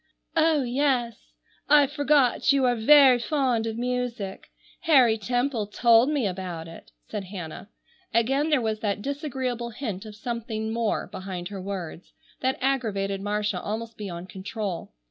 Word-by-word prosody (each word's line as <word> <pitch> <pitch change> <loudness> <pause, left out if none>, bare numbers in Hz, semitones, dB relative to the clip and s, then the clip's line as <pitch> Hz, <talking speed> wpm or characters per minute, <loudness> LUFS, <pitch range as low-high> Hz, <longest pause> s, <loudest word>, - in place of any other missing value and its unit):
"Oh, 315 -3 +3
yes, 250 -2 -1 0.4
I 295 -1 +7
forgot 285 -3 +2
you 275 -2 +3
are 245 - +3
very 260 +2 +7
fond 250 -4 0
of 225 0 -4
music. 245 -5 -3 0.3
Harry 265 -9 +5
Temple 245 0 -1
told 235 +4 +4
me 290 -6 0
about 180 -4 -4
it," 165 - -13 0.2
said 210 -3 -5
Hannah. 185 0 -8 0.4
Again 270 +7 +2
there 300 -3 +3
was 220 -1 -1
that 205 -1 -2
disagreeable 260 -4 -3
hint 220 -4 -5
of 210 - -10
something 220 -1 -4
more 230 -2 0
behind 185 -2 -6
her 195 -2 -6
words, 185 -3 -6 0.3
that 260 0 0
aggravated 205 -8 0
Marcia 205 -2 -1
almost 225 +2 -5
beyond 185 -4 -6
control. 195 -1 -5
230 Hz, 145 wpm, -26 LUFS, 200-260 Hz, 0.4 s, I